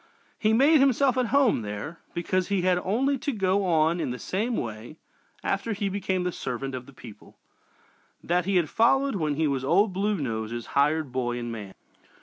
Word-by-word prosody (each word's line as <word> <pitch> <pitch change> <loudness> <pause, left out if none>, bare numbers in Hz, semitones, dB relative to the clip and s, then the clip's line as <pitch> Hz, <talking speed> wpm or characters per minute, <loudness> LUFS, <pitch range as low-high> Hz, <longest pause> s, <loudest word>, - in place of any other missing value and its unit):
He 215 - +2
"made 280 +7 +5
himself 270 -1 +3
at 255 -2 +1
home" 270 - +3
there, 105 +10 -6 0.2
because 185 +2 0
he 200 -3 0
had 180 -1 +3
only 265 +7 +1
to 285 - -2
go 195 -3 +1
on 165 0 +2
in - - -2
the 125 - -4
same 220 - -2
way 115 +6 -6 0.5
after 200 +3 -1
he 200 -1 -2
became 190 -2 -1
the 180 - -1
"servant 135 -2 -4
of 125 -1 -6
the - - -12
people" 115 -5 -14 0.9
that 175 +1 +1
he 195 0 0
had 175 -3 +3
followed 270 - +2
when 155 -5 -1
he 160 +2 +1
was 135 -3 -1
"Old 190 +8 +3
Blue 205 +3 0
Nose's" 115 -4 -4
hired 150 0 +2
boy 120 -1 -2
and 120 -1 -4
man. 105 -4 -8
180 Hz, 190 wpm, -26 LUFS, 130-210 Hz, 0.9 s, made